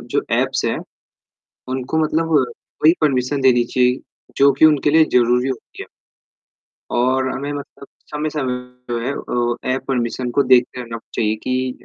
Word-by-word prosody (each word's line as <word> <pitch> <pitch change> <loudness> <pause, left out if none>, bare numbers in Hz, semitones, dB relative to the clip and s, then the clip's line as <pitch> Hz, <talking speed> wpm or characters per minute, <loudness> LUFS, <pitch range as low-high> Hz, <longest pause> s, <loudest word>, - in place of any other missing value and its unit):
जो - - 0 0.2
ऐप्स - - -1
हैं, - - 0 0.9
उनको 130 +4 -3
मतलब 165 +1 0 0.5
वही 160 +2 +7
परमिशन 135 -1 +1
देनी 125 -2 +4
चाहिए 125 +1 +1 0.4
जो 140 0 +6
कि 140 - +5
उनके 150 -2 +4
लिए 160 0 +6
ज़रूरी 125 +1 +3
होती 130 -3 -7
है। - - -16 1.0
और 130 +2 +1
हमें 140 +3 -4
मतलब 140 -1 -9 0.2
समय, 150 +1 -2
समय 150 -2 -3 0.4
पे 120 - -3
जो 120 - -1 0.7
है 130 - +1
ऐप 135 - -6
परमिशन 125 -1 -1
को 140 +3 +2
देखते 125 0 +3
रहना 115 -1 -6 0.2
चाहिए 110 -1 +1
कि 130 0 -1
130 Hz, 155 wpm, -19 LUFS, 125-145 Hz, 1.0 s, वही